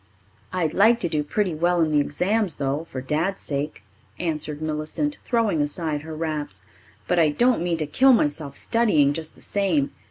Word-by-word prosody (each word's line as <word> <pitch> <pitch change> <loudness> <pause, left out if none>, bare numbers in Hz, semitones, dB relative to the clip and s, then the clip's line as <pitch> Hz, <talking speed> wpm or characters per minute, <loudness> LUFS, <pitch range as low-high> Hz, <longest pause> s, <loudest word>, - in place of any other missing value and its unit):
"I'd 175 -4 -1
like 225 +4 +5
to 175 - +3
do 155 -2 0
pretty 185 +4 -1
well 175 +3 +1
in 160 -1 +2
the 150 - +4
exams, 180 +6 0
though, 140 +3 -2
for 130 - -5
Dad's 160 +9 -1
sake," 145 +1 -4 0.3
answered 155 -3 -3
Millicent, 155 - -2
throwing 225 - +1
aside 150 0 -2
her 160 +1 -7
wraps. 150 - -3 0.4
"But 180 - +2
I 160 -2 +5
don't 240 +7 +2
mean 170 -1 0
to 155 - -1
kill 265 - +4
myself 145 - +1
studying, 180 -12 +3
just 160 +1 -6
the - - -15
same. 180 -9 +1
160 Hz, 180 wpm, -24 LUFS, 150-190 Hz, 0.4 s, like